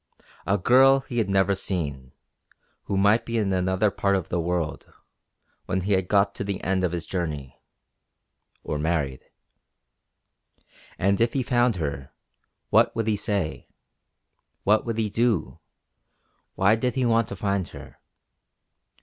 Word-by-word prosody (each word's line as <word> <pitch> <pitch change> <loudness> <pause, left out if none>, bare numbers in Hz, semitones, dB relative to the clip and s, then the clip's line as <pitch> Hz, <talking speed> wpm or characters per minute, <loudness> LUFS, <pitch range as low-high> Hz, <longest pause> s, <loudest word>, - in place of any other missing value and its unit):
A 100 - +2
girl 135 +7 +5
he 130 -3 -4
had 110 - 0
never 95 0 +3
seen, 75 -9 -3 0.7
who 100 - -2
might 100 +4 +4
be 115 0 -3
in 100 -3 0
another 95 +3 +1
part 100 0 +1
of 95 -4 -3
the 85 - -1
world, 85 -2 -3 0.8
when 95 - -1
he 100 +3 -3
had 95 -1 +1
got 100 0 +2
to - - -5
the 100 -1 -3
end 95 +1 0
of 90 - +1
his 85 -2 -4
journey 75 -8 -5 1.0
or 75 - -3
married. 75 -4 -1 1.7
And 100 +3 +1
if 115 0 +2
he 135 - 0
found 120 -2 +2
her, 70 -5 -4 0.6
what - - +4
would 115 -1 -1
he 110 -1 +1
say? 100 -6 -2 1.0
What 105 +3 +2
would 115 -1 -2
he 110 -2 -1
do? 115 -4 0 1.0
Why 100 +3 +4
did 125 +3 -2
he 130 -2 +1
want 115 -1 +2
to - - -6
find 100 -2 -1
her? - - -12
100 Hz, 150 wpm, -25 LUFS, 90-115 Hz, 1.7 s, girl